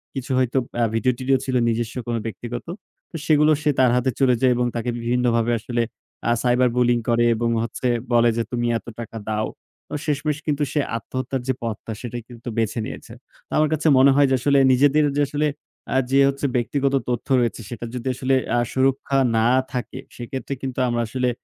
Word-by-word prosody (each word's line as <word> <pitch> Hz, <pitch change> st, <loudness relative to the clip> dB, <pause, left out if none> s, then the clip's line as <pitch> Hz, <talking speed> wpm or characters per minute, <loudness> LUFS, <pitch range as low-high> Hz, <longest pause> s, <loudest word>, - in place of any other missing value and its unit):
কিছু 135 Hz, -1 st, -4 dB
হয়তো 130 Hz, 0 st, +1 dB, 0.2 s
আ -, -, +4 dB
ভিডিও 125 Hz, +3 st, +2 dB
টিডিও 130 Hz, +1 st, +2 dB
ছিল, 130 Hz, -, -2 dB
নিজস্ব 115 Hz, 0 st, -1 dB
কোনো 115 Hz, -1 st, -1 dB
ব্যক্তিগত। 120 Hz, +3 st, -6 dB, 0.5 s
তো -, -, -10 dB
সেগুলো 150 Hz, 0 st, +4 dB
সে 150 Hz, -, +2 dB
তার 130 Hz, -2 st, +5 dB
হাতে 125 Hz, +1 st, +1 dB
চলে 130 Hz, -2 st, +4 dB
যায় 130 Hz, -1 st, +5 dB
এবং 125 Hz, 0 st, +1 dB
তাকে 120 Hz, +1 st, -2 dB
বিভিন্নভাবে 120 Hz, -1 st, +1 dB
আসলে 120 Hz, +2 st, -2 dB, 0.5 s
আ -, -, +4 dB
cyber 125 Hz, 0 st, +3 dB
bullying 120 Hz, -1 st, +3 dB
করে. 120 Hz, 0 st, +3 dB
এবং 115 Hz, +1 st, 0 dB
হচ্ছে 115 Hz, +2 st, -3 dB, 0.3 s
বলে 120 Hz, 0 st, +5 dB
যে, 115 Hz, -, +1 dB
তুমি 120 Hz, -1 st, -1 dB
এত 110 Hz, -, -13 dB
টাকা 115 Hz, -1 st, -7 dB
দাও। 110 Hz, 0 st, 0 dB, 0.4 s
তো -, -, -11 dB
শেষমেষ 150 Hz, 0 st, -1 dB
কিন্তু 150 Hz, -1 st, +1 dB
সে 150 Hz, -, +1 dB, 0.2 s
আত্মহত্যার 130 Hz, +3 st, -3 dB
যে, 130 Hz, -, +2 dB
পথটা 115 Hz, 0 st, -4 dB
সেটাই 120 Hz, -1 st, -6 dB
কিন্তু 120 Hz, 0 st, -12 dB
বেছে 115 Hz, +1 st, 0 dB
নিয়েছে। -, -, -8 dB, 0.3 s
তো -, -, -42 dB
আমার 155 Hz, 0 st, +3 dB
কাছে 155 Hz, +1 st, 0 dB
মনে 135 Hz, +2 st, +7 dB
হয় 140 Hz, 0 st, +5 dB
যে, 130 Hz, -, +3 dB
আসলে 140 Hz, +3 st, +3 dB
নিজেদের 145 Hz, +4 st, +4 dB
যে, -, -, +3 dB
আসলে 150 Hz, +2 st, 0 dB, 0.5 s
আ -, -, +4 dB
যে, 135 Hz, -, +4 dB
হচ্ছে 140 Hz, +1 st, -3 dB
ব্যক্তিগত 135 Hz, +3 st, 0 dB, 0.2 s
তথ্য 120 Hz, -1 st, -2 dB
রয়েছে 120 Hz, -1 st, -1 dB
সেটা 120 Hz, -1 st, -6 dB
যদি 125 Hz, 0 st, -5 dB
আসলে 130 Hz, +1 st, +1 dB, 0.2 s
আ -, -, +3 dB
সুরক্ষা 135 Hz, +1 st, +1 dB, 0.2 s
না 110 Hz, +1 st, +3 dB, 0.3 s
থাকে, 125 Hz, 0 st, -4 dB, 0.2 s
সেক্ষেত্রে 130 Hz, +3 st, -5 dB
কিন্তু 130 Hz, -1 st, -4 dB
আমরা 120 Hz, 0 st, 0 dB
আসলে 125 Hz, +1 st, 0 dB
125 Hz, 195 wpm, -22 LUFS, 120-135 Hz, 0.5 s, মনে